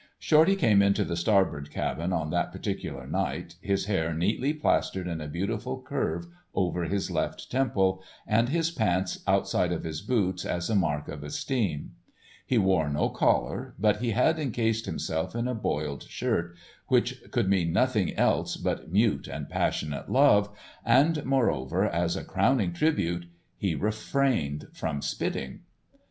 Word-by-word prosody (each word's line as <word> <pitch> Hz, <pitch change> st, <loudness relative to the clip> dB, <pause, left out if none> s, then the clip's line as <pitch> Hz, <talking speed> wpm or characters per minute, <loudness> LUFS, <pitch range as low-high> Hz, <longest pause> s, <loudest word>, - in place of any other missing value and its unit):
Shorty 160 Hz, +5 st, +4 dB
came 115 Hz, -, +4 dB
into 100 Hz, 0 st, +3 dB
the 85 Hz, -, -2 dB
Starbird 85 Hz, -5 st, +1 dB
cabin -, -, -2 dB
on -, -, -1 dB
that -, -, 0 dB
particular -, -, -4 dB
night, 85 Hz, 0 st, -3 dB
his 100 Hz, -1 st, 0 dB
hair 85 Hz, -6 st, 0 dB
neatly 110 Hz, -, +1 dB
plastered 150 Hz, -11 st, 0 dB
in 85 Hz, -2 st, -3 dB
a 75 Hz, -, -5 dB
beautiful 105 Hz, -, -3 dB
curve 140 Hz, +5 st, -2 dB, 0.3 s
over 90 Hz, -2 st, 0 dB
his 100 Hz, +3 st, -2 dB
left -, -, -3 dB
temple, 95 Hz, -8 st, +1 dB, 0.2 s
and 115 Hz, +3 st, +2 dB
his 165 Hz, +2 st, +1 dB
pants 95 Hz, -, 0 dB
outside 90 Hz, -, +2 dB
of 85 Hz, -, -2 dB
his 80 Hz, -1 st, -4 dB
boots 95 Hz, -7 st, 0 dB
as 85 Hz, +4 st, -2 dB
a -, -, +2 dB
mark 75 Hz, -6 st, 0 dB
of 75 Hz, -, -7 dB
esteem. 90 Hz, -, -2 dB, 0.6 s
He 125 Hz, -, +2 dB
wore 95 Hz, -7 st, +3 dB
no 75 Hz, +1 st, +1 dB
collar, -, -, 0 dB
but 105 Hz, +1 st, +3 dB
he 120 Hz, +2 st, -1 dB
had 125 Hz, +8 st, +2 dB
encased 115 Hz, -5 st, 0 dB
himself 80 Hz, +2 st, -3 dB
in 120 Hz, +1 st, -1 dB
a 125 Hz, -, -1 dB
boiled 75 Hz, -, -2 dB
shirt, 85 Hz, 0 st, -1 dB, 0.3 s
which 125 Hz, 0 st, +1 dB
could 120 Hz, -5 st, 0 dB
mean 90 Hz, -4 st, +2 dB
nothing 115 Hz, -4 st, +1 dB
else -, -, +1 dB
but -, -, -3 dB
mute 105 Hz, +3 st, +2 dB
and -, -, -6 dB
passionate 75 Hz, -2 st, -2 dB
love, 115 Hz, -7 st, +5 dB, 0.3 s
and 145 Hz, +6 st, +4 dB
moreover, 115 Hz, -, +1 dB
as -, -, 0 dB
a -, -, -4 dB
crowning 110 Hz, -10 st, +2 dB
tribute, 85 Hz, -, 0 dB, 0.3 s
he 95 Hz, -5 st, -1 dB
refrained 110 Hz, -, 0 dB
from 75 Hz, -3 st, -3 dB
spitting. 65 Hz, -1 st, -3 dB
100 Hz, 155 wpm, -28 LUFS, 85-125 Hz, 0.6 s, love